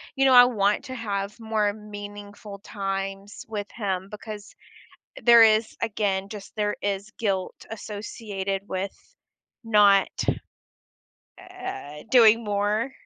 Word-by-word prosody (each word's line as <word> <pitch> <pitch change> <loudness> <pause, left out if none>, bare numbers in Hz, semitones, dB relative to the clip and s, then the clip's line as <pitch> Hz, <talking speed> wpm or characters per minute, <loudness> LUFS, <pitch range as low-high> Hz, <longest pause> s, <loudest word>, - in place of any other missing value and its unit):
you 270 - +2
know, 265 - +6
I 245 0 +10
want 210 -4 +1
to 260 - -6
have 205 -3 -3
more 220 -2 0
meaningful 205 -1 -9
times 195 0 -5
with 210 -2 -4
him 190 -4 -2
because 210 -1 -9 0.7
there 235 -1 +8
is, 220 0 +3
again, 200 -3 -1
just 205 -2 -10
there 210 -1 0
is 200 0 -2
guilt 195 -4 -1 0.2
associated 205 -2 -5
with 190 +1 -3 0.7
not, 205 -3 +5 1.3
uh, 145 +1 -8
doing 230 -2 +6
more. 210 +4 0
205 Hz, 115 wpm, -25 LUFS, 200-220 Hz, 1.3 s, I